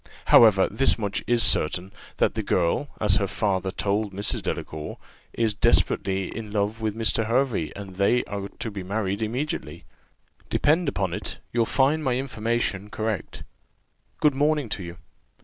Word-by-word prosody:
However, 105 Hz, -4 st, +7 dB
this 125 Hz, +6 st, +1 dB
much 100 Hz, -3 st, -2 dB
is 120 Hz, -1 st, +3 dB
certain, 90 Hz, +5 st, +2 dB, 0.3 s
that -, -, +2 dB
the -, -, -2 dB
girl, 90 Hz, +11 st, +1 dB
as 105 Hz, -1 st, +3 dB
her 100 Hz, -3 st, 0 dB
father 95 Hz, -2 st, -1 dB
told 100 Hz, +1 st, -1 dB
Mrs. 100 Hz, +2 st, -1 dB
Delacour, 75 Hz, -1 st, -4 dB, 0.3 s
is 115 Hz, -2 st, 0 dB
desperately 95 Hz, -2 st, +1 dB
in 110 Hz, -2 st, -6 dB
love 105 Hz, +2 st, -1 dB
with 110 Hz, -1 st, -1 dB
Mr. 115 Hz, -1 st, +1 dB
Hervey, 115 Hz, -, +1 dB
and 95 Hz, -2 st, -9 dB
they 110 Hz, +5 st, +3 dB
are 100 Hz, -1 st, -5 dB
to 115 Hz, -, -4 dB
be 100 Hz, -1 st, -6 dB
married 100 Hz, +1 st, -2 dB
immediately. 110 Hz, -, -3 dB, 0.7 s
Depend 160 Hz, +1 st, +2 dB
upon 95 Hz, -9 st, -2 dB
it, -, -, -5 dB, 0.2 s
you'll 115 Hz, -2 st, +2 dB
find 145 Hz, +4 st, +2 dB
my 130 Hz, -3 st, +1 dB
information 115 Hz, -5 st, -2 dB
correct. 110 Hz, -1 st, -4 dB, 0.8 s
Good 150 Hz, -2 st, +4 dB
morning 145 Hz, -2 st, +1 dB
to 100 Hz, -, -3 dB
you. 85 Hz, -1 st, -8 dB
105 Hz, 155 wpm, -25 LUFS, 95-120 Hz, 0.8 s, However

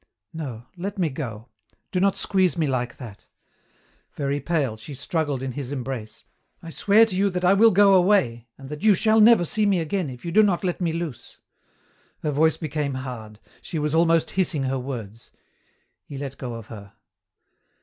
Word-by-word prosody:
No! 130 Hz, -8 st, -6 dB
Let 195 Hz, +3 st, -5 dB
me 170 Hz, -5 st, 0 dB
go. 115 Hz, -5 st, -6 dB, 0.4 s
Do 180 Hz, -, 0 dB
not 195 Hz, +1 st, +2 dB
squeeze 185 Hz, -2 st, +1 dB
me 160 Hz, -, +1 dB
like 125 Hz, -3 st, -2 dB
that!" 115 Hz, -7 st, -11 dB, 0.9 s
Very 140 Hz, 0 st, -1 dB
pale, 145 Hz, -8 st, -1 dB
she 110 Hz, +6 st, -10 dB
struggled 145 Hz, -2 st, -2 dB
in 135 Hz, -, -3 dB
his 135 Hz, 0 st, -6 dB
embrace. 125 Hz, -5 st, -6 dB, 0.4 s
"I 165 Hz, -, -8 dB
swear 210 Hz, +6 st, +4 dB
to 210 Hz, -5 st, -3 dB
you 200 Hz, +2 st, +2 dB
that 180 Hz, -1 st, -2 dB
I 185 Hz, -, +6 dB
will 220 Hz, +3 st, +6 dB
go 200 Hz, 0 st, +5 dB
away 175 Hz, -, +3 dB
and 135 Hz, -1 st, -11 dB
that 150 Hz, +1 st, -7 dB
you 215 Hz, -2 st, +5 dB
shall 220 Hz, +3 st, +3 dB
never 220 Hz, -5 st, +6 dB
see 210 Hz, +5 st, +1 dB
me 195 Hz, -3 st, +2 dB
again 170 Hz, 0 st, -2 dB
if 125 Hz, +2 st, -10 dB
you 170 Hz, -, -3 dB
do 215 Hz, -, +6 dB
not 200 Hz, -4 st, +1 dB
let 180 Hz, 0 st, -2 dB
me 170 Hz, -2 st, +1 dB
loose." 165 Hz, -6 st, -6 dB, 0.9 s
Her 150 Hz, -, 0 dB
voice 160 Hz, +3 st, +2 dB
became 150 Hz, -3 st, -3 dB
hard. 120 Hz, -5 st, -7 dB, 0.2 s
She 165 Hz, -, -6 dB
was 150 Hz, 0 st, -1 dB
almost 165 Hz, 0 st, +3 dB
hissing 175 Hz, -7 st, 0 dB
her 135 Hz, 0 st, -1 dB
words. 115 Hz, -4 st, -7 dB, 0.7 s
He 140 Hz, -, -9 dB
let 135 Hz, -1 st, -6 dB
go 125 Hz, -3 st, -5 dB
of 115 Hz, -2 st, -8 dB
her. 100 Hz, -3 st, -11 dB
150 Hz, 190 wpm, -24 LUFS, 130-185 Hz, 0.9 s, I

